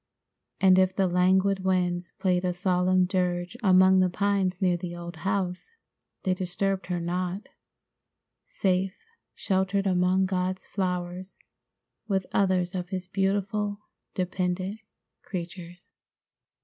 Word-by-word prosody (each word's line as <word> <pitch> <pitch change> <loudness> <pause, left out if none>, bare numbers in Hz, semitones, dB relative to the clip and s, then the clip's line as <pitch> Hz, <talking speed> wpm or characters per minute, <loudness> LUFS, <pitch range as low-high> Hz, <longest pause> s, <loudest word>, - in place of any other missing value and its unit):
And 190 -1 +6
if 185 0 +2
the 190 -1 +2
languid 190 +2 +2
winds 180 -2 0
played 185 -3 +1
a 180 -1 0
solemn 180 0 +2
dirge 180 +1 -1
among 185 -2 +6
the 185 -1 +3
pines 195 -1 0
near 180 -2 +2
the 175 0 -5
old 170 -1 -8
house, 190 - -2 0.5
they 185 - +2
disturbed 190 +1 -2
her 180 -1 -1
not, 180 +7 -3 1.0
safe 190 - 0 0.4
sheltered 195 0 0
among 185 0 +2
God's 185 0 -2
flowers 180 -1 -3 0.7
with 190 -3 0
others 185 -2 +2
of 180 -1 -4
his 185 -2 -4
beautiful, 205 +2 -1 0.4
dependent 185 +2 -2 0.4
creatures. 175 -1 -8
185 Hz, 115 wpm, -27 LUFS, 180-190 Hz, 1.0 s, And